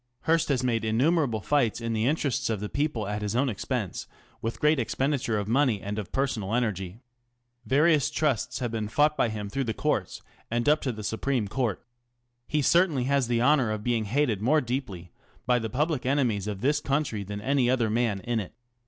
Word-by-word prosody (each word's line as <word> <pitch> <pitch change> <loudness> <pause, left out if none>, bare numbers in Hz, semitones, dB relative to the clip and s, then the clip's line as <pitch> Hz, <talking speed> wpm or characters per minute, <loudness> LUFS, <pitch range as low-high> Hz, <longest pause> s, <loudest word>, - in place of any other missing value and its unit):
Hearst 165 0 +1
has 130 -3 +1
made 115 -3 0
innumerable 120 - +1
fights 130 -2 +1
in 115 -1 -3
the 110 +1 +1
interest 140 -5 0
of 110 -3 -1
the 105 +1 -4
people 140 -7 -1
at 105 +1 -3
his 105 +1 -2
own 130 +2 +2
expense, 105 -2 -3 0.3
with 115 0 -4
gTeal 150 -1 +3
expenditure 130 -1 0
of 100 -1 -2
money 120 -2 +2
and 100 +2 -4
of 105 - -7
personal 115 -6 -1
energy. 100 -5 -2 0.7
Variou. 150 +1 +3
trusts 150 -7 0
have 120 -3 -3
been 110 -2 -2
fought 150 +5 +2
by 120 - +1
him 105 -2 -4
through 135 +7 -2
the 110 -3 -2
courts - - -2 0.3
and 120 +3 -1
up 150 +1 +4
to 130 - -1
the 110 -2 -7
Supreme 110 +2 -1
Court. 120 -1 -2 0.6
Hecertainly 150 -1 +3
has 140 -1 +1
the 120 0 +1
honour 135 -4 +4
of 110 -1 -3
being 115 -2 0
hated 115 -2 0
more 145 +8 +3
deeply 120 - -4 0.3
by 125 -1 +3
the 110 -1 -4
public 145 +1 0
enemies 125 -7 0
of 100 -2 -4
this 145 +3 +2
country 140 -8 -1
than 100 +1 -6
any 130 +2 +1
other 120 -4 +1
man 110 -4 0
in 120 0 -1
it. 105 +1 -7
120 Hz, 195 wpm, -27 LUFS, 110-140 Hz, 0.7 s, up